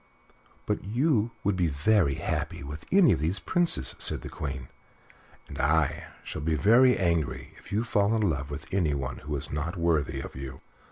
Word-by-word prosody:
"But - - -2
you 120 - +1
would 100 -1 +1
be 90 -2 +1
very 75 +1 +2
happy - - -3
with 75 +3 -8
any 190 -8 +6
of 85 - +1
these 80 +6 0
Princes," 175 - +2
said - - 0
the - - -6
Queen, 65 -4 -5 0.8
"and - - -9
I 75 +1 +1 0.2
shall - - -6
be 80 +1 0
very 125 +8 +5
angry 85 -5 -1
if - - -16
you 105 +3 +1
fall 105 -1 +2
in 110 - +1
love 70 -4 -2
with 75 +3 -6
anyone 70 -9 -1
who 75 0 -5
is 70 - -5
not 80 +5 -3
worthy 85 -3 +1
of - - -7
you." 65 0 -7
85 Hz, 180 wpm, -28 LUFS, 70-105 Hz, 0.8 s, any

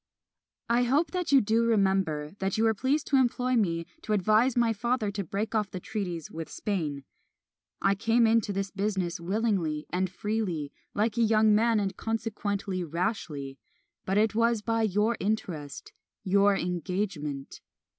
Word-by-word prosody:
I 235 +1 +3
hope 275 +7 +2
that 360 -4 -2
you 275 -2 +7
do 225 +2 +2
remember 190 -9 +1
that 195 +1 -1
you 220 - +2
were 225 0 +4
pleased 270 +7 0
to 275 - +2
employ 250 0 +2
me 170 -7 +1 0.2
to 215 - -2
advise 215 +5 +3
my 235 -1 +3
father 235 -1 -1
to 200 0 -3
break 200 +6 -3
off 210 -3 0
the 185 - -6
treaties 180 -5 -4
(with 165 0 -6
Spain). 155 -10 -3 0.8
I 195 - +4
came 230 +4 +2
into 225 -2 +2
this 195 0 -2
business 190 -4 -2
willingly 180 -5 -1
and 185 +1 0
freely, 185 -7 -2 0.2
like 215 +2 0
a - - +3
young 220 -1 +4
man, 225 +1 +3
and 195 -2 -2
consequently 205 -4 -2
rashly; 160 -6 -3 0.4
but 195 +1 0
it 215 +1 +3
was 230 -1 +2
by 225 0 0
your 215 +2 +1
interest 175 -9 -3 0.3
your 200 +1 +4
engagement. 175 -5 -3
205 Hz, 155 wpm, -28 LUFS, 180-225 Hz, 0.8 s, you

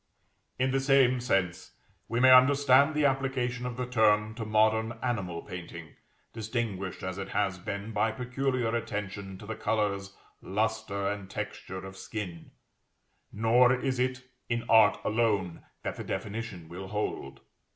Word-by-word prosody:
In 130 +1 +1
the 135 - +2
same 135 -2 +4
sense 95 -8 -1 0.3
we 115 - -1
may 130 +1 +7
understand 140 +2 +6
the 150 -1 +2
application 130 -2 0
of 125 -1 -6
the 125 - -2
term 110 -3 +3
to 115 0 -5
modern 110 +1 +2
animal 95 -9 -2
painting, 85 -2 -8 0.4
distinguished 110 -4 -3
as 95 +1 -4
it 95 0 -5
has 95 -2 0
been 100 +4 -5
by 110 +1 +1
peculiar 125 -1 -1
attention 100 -3 -4
to 105 - -11
the 110 - -4
colors, 100 -3 -1 0.2
lustre, 105 -1 -1
and 100 -1 -4
texture 95 -2 -6
of 95 0 -9
skin; 95 -5 -6 0.8
nor 115 +4 +4
is 130 0 0
it 130 +1 -1 0.3
in 115 -1 -1
art 110 -3 +6
alone 105 -6 0 0.2
that - - -4
the - - -5
definition 105 -5 -5
will 90 +3 -8
hold. 105 -9 -4
110 Hz, 145 wpm, -29 LUFS, 100-125 Hz, 0.8 s, may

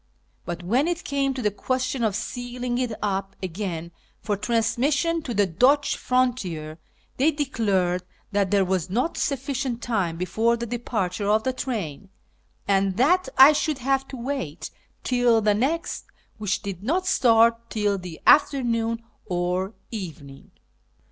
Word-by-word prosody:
But 175 +1 -5
when 245 - +2
it 350 0 -2
came 275 -1 0
to 255 - -4
the 210 - +2
question 255 +3 -2
of 215 -3 +1
sealing 245 +2 -3
it 250 -2 -1
up 195 -1 -2
again 170 -2 -4 0.3
for 210 - -1
transmission 260 - +1
to 270 - -6
the 205 0 +4
Dutch 255 - +3
frontier, 185 -12 -1 0.4
they 280 +5 +4
declared 205 - 0 0.3
that 200 -2 +1
there 200 -1 +3
was 185 -1 -1
not 250 - 0
sufficient 270 -3 -2
time 190 -8 -1
before 220 +7 +1
the 235 - -4
departure 215 -4 -2
of 215 +1 +3
the 260 - 0
train, 200 - -4 0.6
and 195 -1 +2
that 355 +9 +3
I 270 +3 +9
should 300 0 0
have 270 +1 0
to 265 - -8
wait 235 - -4 0.3
till 245 -2 +3
the 210 -1 +3
next, 290 - -1 0.3
which 205 0 -1
did 195 -3 -5
not 340 - 0
start 230 -7 +4
till 205 -2 0
the 180 -3 -8
afternoon 230 -5 +3 0.2
or 180 +1 -1 0.2
evening. 160 -10 -8
230 Hz, 145 wpm, -24 LUFS, 195-260 Hz, 0.6 s, I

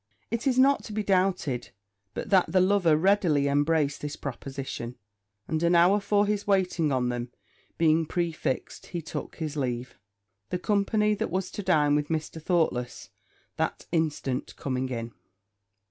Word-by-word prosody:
It 230 +4 -1
is 255 -2 +2
not 275 +2 +4
to 215 - -7
be 215 0 -1
doubted 185 -10 0 0.5
but - - -5
that 185 -4 +4
the 185 - +4
lover 185 -4 +4
readily 165 -5 +3
embraced 145 0 +1
this 150 0 -4
proposition; 135 -2 -6 0.5
and 160 0 -1
an 170 +1 +3
hour 180 +4 +5
for 205 0 +2
his 205 0 -1
waiting 180 -6 +2
on 125 -2 +1
them 120 0 -3 0.5
being 160 -1 +3
prefixed, 165 -6 -2
he 175 - -4
took 155 - -6
his 155 -3 -4
leave, 125 -3 -3 0.5
the - - -1
company 210 +2 +1
that 220 +2 -2
was 185 +2 -2
to - - -5
dine 155 -6 +3
with 150 0 +1
Mr. 160 0 -3
Thoughtless 150 -8 -1 0.5
that - - -2
instant 150 -6 -1
coming 130 -1 -2
in. 115 -2 -4
165 Hz, 155 wpm, -27 LUFS, 140-195 Hz, 0.5 s, hour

